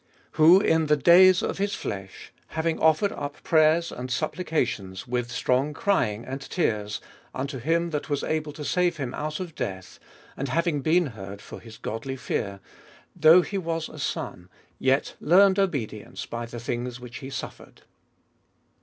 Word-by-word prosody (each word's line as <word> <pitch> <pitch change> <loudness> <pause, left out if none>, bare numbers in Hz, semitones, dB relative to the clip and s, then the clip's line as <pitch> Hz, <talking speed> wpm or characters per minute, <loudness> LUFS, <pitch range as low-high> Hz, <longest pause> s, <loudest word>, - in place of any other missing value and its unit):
Who 165 +4 +7
in 160 -5 +2
the 150 0 +4
days 175 +5 +6
of - - -2
his 200 0 0
flesh, 95 -1 -7
having 160 +1 -2
offered 160 +6 +3
up 145 0 -6
prayers 160 +1 +3
and 125 +1 -6
supplica 160 +3 0
tions, 95 -3 -7
with 120 -1 -2
strong 130 +4 0
crying 115 - 0
and 135 +1 -5
tears, 105 - -2 0.3
unto 135 0 -4
him 165 +6 0
that 150 0 -3
was 145 -1 -1
able 155 -1 -2
to 150 0 -7
save 175 0 +1
him 130 -3 -4
out 150 0 -4
of 180 -3 -6
death, 95 -7 -6 0.4
and 140 - -3
having 165 -1 0
been 170 +5 +3
heard 100 -6 -8
for - - -10
his 115 -2 -13
godly 125 +5 -5
fear, 100 -7 -3 0.5
8. 175 - -20
Though 160 +3 +8
he 200 +2 -3
was 165 -2 -3
a - - -11
Son, 90 +1 -4 0.3
yet 135 +2 +1
learned 190 +4 +5
obedience 135 - -2
by 120 0 -5
the 120 0 -7
things 120 +1 -4
which 125 -1 -9
he 135 -1 -8
suffered. - - -8
145 Hz, 170 wpm, -26 LUFS, 120-165 Hz, 0.5 s, Though